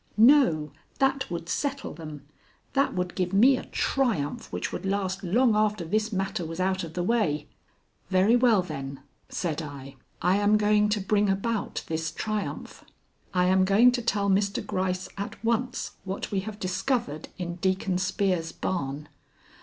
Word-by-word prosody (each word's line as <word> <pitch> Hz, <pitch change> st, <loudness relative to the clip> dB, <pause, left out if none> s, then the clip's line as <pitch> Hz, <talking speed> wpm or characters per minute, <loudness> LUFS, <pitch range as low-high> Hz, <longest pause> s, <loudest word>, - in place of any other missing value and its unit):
"No; 220 Hz, -, +5 dB, 0.3 s
that 270 Hz, 0 st, +1 dB
would 170 Hz, -1 st, -4 dB
settle 280 Hz, -, -2 dB
them; 150 Hz, -3 st, -9 dB, 0.5 s
that 275 Hz, 0 st, +2 dB
would 180 Hz, -1 st, -2 dB
give 180 Hz, 0 st, -2 dB
me 245 Hz, +7 st, +6 dB
a -, -, -5 dB
triumph 220 Hz, -, -1 dB
which 90 Hz, -, -3 dB
would -, -, -4 dB
last 195 Hz, 0 st, -1 dB
long 225 Hz, +5 st, +3 dB
after 210 Hz, -4 st, +1 dB
this 215 Hz, +6 st, 0 dB
matter 195 Hz, -2 st, -2 dB
was 165 Hz, +1 st, -6 dB
out 190 Hz, 0 st, 0 dB
of 160 Hz, -1 st, -8 dB
the 175 Hz, -, -1 dB
way." 175 Hz, -9 st, +1 dB, 0.6 s
"Very 190 Hz, +5 st, +4 dB
well, 235 Hz, -6 st, +4 dB
then," 140 Hz, -5 st, -6 dB, 0.3 s
said 165 Hz, -3 st, -2 dB
I, 140 Hz, -2 st, -9 dB, 0.2 s
"I 180 Hz, +3 st, +3 dB
am 205 Hz, +1 st, +4 dB
going 210 Hz, 0 st, +3 dB
to 210 Hz, 0 st, +1 dB
bring 205 Hz, +1 st, +2 dB
about 205 Hz, +3 st, -1 dB
this 160 Hz, 0 st, -2 dB
triumph. 215 Hz, +4 st, -4 dB, 0.5 s
I 180 Hz, -1 st, +2 dB
am 185 Hz, +1 st, +4 dB
going 205 Hz, +6 st, +6 dB
to 245 Hz, 0 st, -1 dB
tell 210 Hz, -3 st, 0 dB
Mr. 200 Hz, 0 st, +1 dB
Gryce 185 Hz, 0 st, -1 dB
at 200 Hz, -, -4 dB
once 245 Hz, +3 st, 0 dB
what 190 Hz, +1 st, -4 dB
we 200 Hz, -, +1 dB
have 205 Hz, +2 st, -6 dB
discovered 185 Hz, -, -2 dB
in 175 Hz, -1 st, -4 dB
Deacon 185 Hz, 0 st, 0 dB
Spear's 185 Hz, -3 st, 0 dB
barn." 150 Hz, -5 st, -3 dB
190 Hz, 160 wpm, -27 LUFS, 170-215 Hz, 0.6 s, me